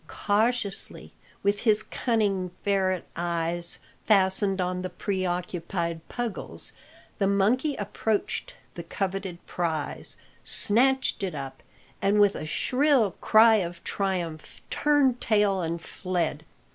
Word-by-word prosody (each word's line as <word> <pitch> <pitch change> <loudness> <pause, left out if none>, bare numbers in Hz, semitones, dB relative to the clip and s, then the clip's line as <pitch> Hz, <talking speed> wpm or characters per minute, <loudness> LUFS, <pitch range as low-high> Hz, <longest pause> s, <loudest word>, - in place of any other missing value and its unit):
Cautiously, 215 0 -1 0.3
with 200 0 +2
his 215 -2 +3
cunning 205 -6 0
ferret 190 -3 +1
eyes 170 0 0 0.3
fastened 195 -1 +3
on 180 0 -1
the 185 - -3
preoccupied 175 -3 -2
Puggles, 240 -4 -2 0.5
the 195 - +3
monkey 225 +9 +2
approached 210 0 -2 0.2
the 170 - -6
coveted 190 0 -4
prize, 160 -4 -3 0.3
snatched 265 +5 +2
it 185 -5 -2
up, 135 -2 -7 0.4
and 200 +2 +3
with 205 -1 +5
a 155 - -5
shrill 255 - +2
cry 220 0 +6
of 175 -3 -4
triumph 175 -6 -3
turned 285 -4 +2
tail 205 -3 +2
and 170 0 -2
fled. 165 -3 -3
195 Hz, 110 wpm, -27 LUFS, 175-215 Hz, 0.5 s, cry